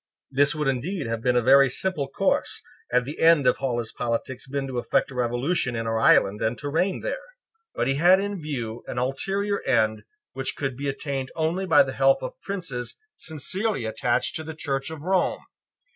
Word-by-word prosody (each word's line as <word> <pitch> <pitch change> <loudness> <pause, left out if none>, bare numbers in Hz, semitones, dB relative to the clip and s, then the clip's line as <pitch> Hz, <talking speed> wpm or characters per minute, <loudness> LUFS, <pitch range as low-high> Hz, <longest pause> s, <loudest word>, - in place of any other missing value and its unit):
This 140 +3 +3
would 150 -2 -1
indeed 140 +6 -1
have 115 0 -3
been 125 +1 +2
a 120 - +3
very 135 +2 +6
simple 150 0 -2
course, 135 - 0 0.3
had 125 0 +2
the 145 +4 -7
end 165 -4 +5
of 125 - +4
all 130 -3 -1
his 115 -2 -3
politics 120 +2 -3
been 140 0 -2
to 130 -2 -3
effect 120 - 0
a - - -8
revolution 125 +2 0
in 115 0 -2
our 115 0 0
island 105 -2 +4
and 115 +2 0
to 145 - -5
reign 180 +6 0
there. - - -3 0.5
But - - 0
he 135 - +2
had 180 +5 +6
in 200 -2 -3
view 120 -7 -4
an - - -5
ulterior 195 +11 -1
end 110 -3 +1 0.3
which 135 - -2
could 135 -3 -3
be 140 +2 -3
attained 135 -1 -3
only 170 +4 -1
by 150 -4 +7
the 135 -1 -5
help 135 0 +3
of - - -7
princes 155 -11 -4 0.2
sincerely 175 - -2
attached 110 +2 0
to 160 - -6
the 160 0 -7
Church 135 -2 -2
of 160 -2 -8
Rome. 185 +1 +1
135 Hz, 200 wpm, -25 LUFS, 125-165 Hz, 0.5 s, by